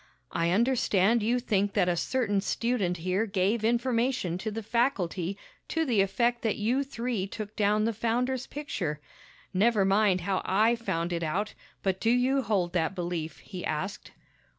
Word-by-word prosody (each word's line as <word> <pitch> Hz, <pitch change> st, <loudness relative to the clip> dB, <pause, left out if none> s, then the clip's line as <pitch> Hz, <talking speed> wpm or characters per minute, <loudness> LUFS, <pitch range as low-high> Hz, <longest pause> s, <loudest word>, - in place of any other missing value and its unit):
"I 170 Hz, -1 st, +1 dB
understand 230 Hz, 0 st, +3 dB
you 235 Hz, +4 st, +1 dB
think 205 Hz, -4 st, 0 dB
that 190 Hz, -4 st, +2 dB
a 175 Hz, -, +2 dB
certain 205 Hz, +2 st, 0 dB
student 210 Hz, -5 st, 0 dB
here 185 Hz, +6 st, 0 dB
gave 200 Hz, +3 st, +1 dB
information 235 Hz, -5 st, +1 dB
to 220 Hz, -, -3 dB
the 220 Hz, +1 st, -5 dB
faculty 200 Hz, -6 st, 0 dB, 0.3 s
to 325 Hz, -1 st, 0 dB
the 230 Hz, -8 st, +3 dB
effect 235 Hz, +5 st, +1 dB
that 220 Hz, -3 st, 0 dB
you 240 Hz, +6 st, +1 dB
three 235 Hz, -6 st, -3 dB
took 210 Hz, +1 st, -7 dB
down 210 Hz, 0 st, +2 dB
the 230 Hz, -, 0 dB
founder's 245 Hz, +4 st, -1 dB
picture. 185 Hz, -, -4 dB, 0.5 s
Never 205 Hz, +1 st, +3 dB
mind 195 Hz, -1 st, +3 dB
how 190 Hz, +1 st, 0 dB
I 220 Hz, +5 st, +3 dB
found 175 Hz, -7 st, -2 dB
it 170 Hz, -, -2 dB
out, 185 Hz, +7 st, -1 dB, 0.3 s
but 190 Hz, -1 st, 0 dB
do 225 Hz, -, +2 dB
you 255 Hz, +3 st, +3 dB
hold 200 Hz, -7 st, 0 dB
that 175 Hz, +1 st, 0 dB
belief?" 170 Hz, -3 st, -4 dB
he 185 Hz, -3 st, -7 dB
asked. 170 Hz, +6 st, -4 dB
210 Hz, 165 wpm, -28 LUFS, 185-235 Hz, 0.5 s, understand